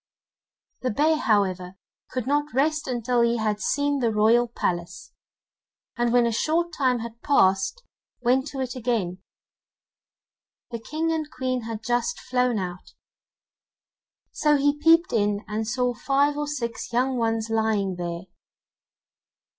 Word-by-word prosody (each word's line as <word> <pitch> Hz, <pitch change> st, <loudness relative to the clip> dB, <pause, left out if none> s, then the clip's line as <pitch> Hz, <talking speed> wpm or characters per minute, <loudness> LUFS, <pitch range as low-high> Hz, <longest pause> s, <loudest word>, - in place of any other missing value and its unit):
The 255 Hz, -, 0 dB
bear, 305 Hz, +8 st, +2 dB
however, 190 Hz, -, 0 dB, 0.3 s
could 255 Hz, -3 st, -3 dB
not 290 Hz, 0 st, 0 dB
rest 305 Hz, +2 st, +1 dB
until 245 Hz, -1 st, 0 dB
he 235 Hz, 0 st, +2 dB
had 215 Hz, -2 st, -1 dB
seen 285 Hz, 0 st, 0 dB
the 235 Hz, -3 st, +1 dB
royal 225 Hz, +3 st, +4 dB
palace, 175 Hz, -5 st, -4 dB, 0.8 s
and 240 Hz, -1 st, +1 dB
when 240 Hz, 0 st, +4 dB
a 235 Hz, -, +1 dB
short 330 Hz, +8 st, 0 dB
time 255 Hz, -4 st, +1 dB
had 235 Hz, 0 st, -8 dB
passed, 195 Hz, -, +2 dB, 0.4 s
went 255 Hz, +3 st, +2 dB
to 275 Hz, -2 st, -6 dB
it 255 Hz, -1 st, -4 dB
again. 225 Hz, -8 st, -1 dB, 1.5 s
The 235 Hz, -, -4 dB
King 315 Hz, +7 st, -2 dB
and 315 Hz, -2 st, -2 dB
Queen 255 Hz, -3 st, -3 dB
had 225 Hz, -1 st, -6 dB
just 240 Hz, +6 st, -1 dB
flown 250 Hz, -2 st, 0 dB
out, 180 Hz, -2 st, -6 dB, 1.4 s
so 300 Hz, -1 st, +2 dB
he 285 Hz, +1 st, +2 dB
peeped 330 Hz, +3 st, +4 dB
in 205 Hz, -2 st, 0 dB
and 215 Hz, +1 st, -3 dB
saw 250 Hz, +1 st, 0 dB
five 280 Hz, +4 st, +1 dB
or 295 Hz, 0 st, -2 dB
six 245 Hz, -6 st, -4 dB
young 255 Hz, +2 st, +1 dB
ones 225 Hz, -1 st, -1 dB
lying 215 Hz, -4 st, 0 dB
there. 170 Hz, 0 st, -4 dB
240 Hz, 140 wpm, -25 LUFS, 220-280 Hz, 1.5 s, royal